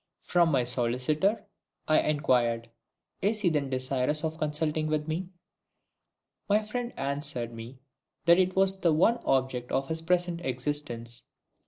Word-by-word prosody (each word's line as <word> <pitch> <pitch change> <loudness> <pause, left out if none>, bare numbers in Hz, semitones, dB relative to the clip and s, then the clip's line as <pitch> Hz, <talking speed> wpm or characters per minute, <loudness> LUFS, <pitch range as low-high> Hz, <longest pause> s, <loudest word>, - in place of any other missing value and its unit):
"From 175 -2 +3
my 135 -5 +2
solicitor?" 125 - 0 0.4
I 155 - +5
inquired. 120 -6 +1 0.5
"Is 210 +2 +1
he 185 - +3
then 145 -4 0
desirous 130 +3 -1
of 160 0 -3
consulting 155 +1 -1
with 155 0 -1
me?" 170 +3 -3 1.2
My 210 +1 +3
friend 240 +3 -4
answered 135 -4 -2
me 115 +3 -9 0.5
that 170 +1 +6
it 185 0 +2
was 190 0 +2
the 170 -4 +3
one 225 +10 +3
object 130 -2 0
of 135 0 0
his 160 0 -2
present 175 0 0
existence. 125 -3 -2
150 Hz, 140 wpm, -28 LUFS, 130-175 Hz, 1.2 s, that